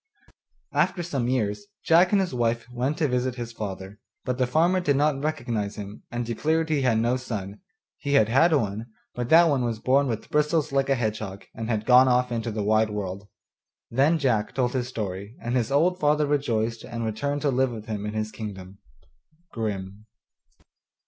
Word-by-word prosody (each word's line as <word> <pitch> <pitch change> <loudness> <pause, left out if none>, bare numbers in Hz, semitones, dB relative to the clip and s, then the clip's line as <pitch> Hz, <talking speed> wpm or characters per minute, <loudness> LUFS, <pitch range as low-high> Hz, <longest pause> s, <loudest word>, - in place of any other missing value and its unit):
After 175 - +1
some 135 -8 -2
years 125 - -1 0.2
Jack 175 +2 +5
and 205 - +4
his 185 -7 -1
wife 115 -1 0
went 125 +5 -1
to 155 - +1
visit 125 -1 -1
his 120 -1 -6
father, 100 -2 -7 0.3
but 125 0 -2
the 130 - +2
farmer 170 +8 +3
did 145 -6 +1
not 145 -1 +1
recognize 115 -9 -2
him, 100 0 -8
and 120 0 -3
declared 160 +7 0
he 150 -3 +2
had 125 -4 +2
no 120 +3 +1
son; 105 -5 -6 0.4
he 140 - -2
had 125 -7 +5
had 135 +9 +4
one, 110 -6 0 0.3
but 120 0 -4
that 165 +2 +8
one 140 -5 +1
was 115 -2 -1
born 135 +5 +2
with 115 -3 -4
bristles 150 0 +1
like 135 0 +1
a 135 - +4
hedgehog, 110 -4 -3
and 115 0 -5
had 110 -2 -1
gone 130 +1 +7
off 125 0 +2
into 115 0 -2
the 110 -1 -3
wide 110 +1 +3
world. 100 -1 -5 0.6
Then 140 +7 +3
Jack 120 -8 0
told 125 -2 0
his 125 -2 -1
story, 100 -2 -5
and 120 +2 -3
his 125 +1 0
old 175 +6 +2
father 150 -1 +3
rejoiced 115 -6 -1
and 115 -1 -5
returned 140 +7 -2
to 145 - +2
live 130 +1 +2
with 110 -3 -7
him 105 -2 -4
in 105 - -5
his 110 0 -2
kingdom. 100 -3 -8 0.7
Grimm. 105 -2 -5
120 Hz, 190 wpm, -25 LUFS, 110-140 Hz, 0.7 s, that